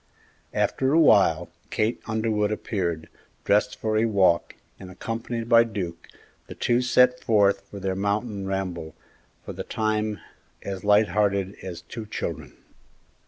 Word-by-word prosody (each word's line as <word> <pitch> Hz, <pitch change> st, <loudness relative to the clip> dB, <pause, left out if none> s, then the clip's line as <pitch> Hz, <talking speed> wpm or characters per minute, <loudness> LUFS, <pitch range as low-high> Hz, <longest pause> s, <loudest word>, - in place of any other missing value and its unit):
After 135 Hz, +1 st, +1 dB
a 165 Hz, -, +5 dB
while, 90 Hz, -, +4 dB, 0.2 s
Kate 110 Hz, +3 st, -1 dB
Underwood 110 Hz, -2 st, 0 dB
appeared, 85 Hz, -7 st, -3 dB, 0.4 s
dressed 105 Hz, +1 st, +2 dB
for 110 Hz, -1 st, -1 dB
a 115 Hz, -, +3 dB
walk, 95 Hz, -6 st, +2 dB, 0.2 s
and, 95 Hz, -, -10 dB
accompanied 115 Hz, +4 st, -5 dB
by 115 Hz, 0 st, +7 dB
Duke, 95 Hz, -7 st, -6 dB, 0.4 s
the -, -, -9 dB
two 120 Hz, +1 st, +1 dB
set 125 Hz, 0 st, +4 dB
forth 100 Hz, -4 st, +3 dB
for 100 Hz, -, -8 dB
their 95 Hz, -1 st, -2 dB
mountain 100 Hz, +1 st, -2 dB
ramble, 90 Hz, -5 st, -4 dB, 0.5 s
for -, -, -6 dB
the -, -, -5 dB
time 110 Hz, -1 st, -1 dB, 0.4 s
as 95 Hz, -2 st, -5 dB
light 105 Hz, +1 st, +4 dB
hearted 100 Hz, 0 st, +1 dB
as 90 Hz, -3 st, -7 dB
two 115 Hz, -2 st, -8 dB
children. 80 Hz, -, -5 dB
105 Hz, 140 wpm, -25 LUFS, 95-110 Hz, 0.5 s, by